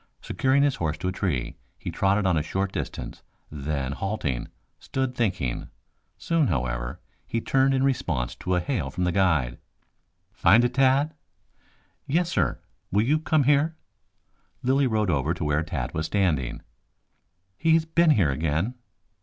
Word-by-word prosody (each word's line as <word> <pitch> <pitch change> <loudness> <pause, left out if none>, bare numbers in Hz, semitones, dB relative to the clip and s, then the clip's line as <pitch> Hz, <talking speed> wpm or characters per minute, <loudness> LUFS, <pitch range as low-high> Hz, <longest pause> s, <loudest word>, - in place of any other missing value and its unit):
Securing 135 +2 +2
his 145 -2 +2
horse 80 -2 -1
to 90 - -2
a - - -1
tree, 85 -10 -2 0.2
he - - -5
trotted 100 +1 +1
on 90 -3 +3
a 80 - +2
short 95 +5 -2
distance, - - -5 0.3
then 70 -2 -3
halting, 70 - -2 0.3
stood 130 -1 -2
thinking. 95 - -1 0.5
Soon, 165 -4 +1
however, - - -2 0.3
he 115 - -1
turned 135 +3 +2
in 130 - +1
response 120 - 0
to 90 - -2
a - - +2
hail 125 +7 -2
from 90 - -3
the 90 - +2
guide. 80 -11 +1 0.7
"Find 115 +4 +5
it, 125 - -1
Tad?" 135 +4 +3 0.9
"Yes, 170 +4 +1
sir; 80 - +1 0.3
will 100 +3 +3
you 150 +5 +3
come 155 -2 +2
here?" 145 +4 +3 0.9
Lilly 135 +2 +3
rode 110 -5 +1
over 75 +2 0
to 85 - -4
where 75 +1 +1
Tad 85 -1 -4
was 80 0 -2
standing. 80 -12 0 0.9
"He 160 - +3
has 160 -1 +2
been 165 +1 +3
here 95 - +4
again." 80 - -1
95 Hz, 155 wpm, -26 LUFS, -, 0.9 s, Find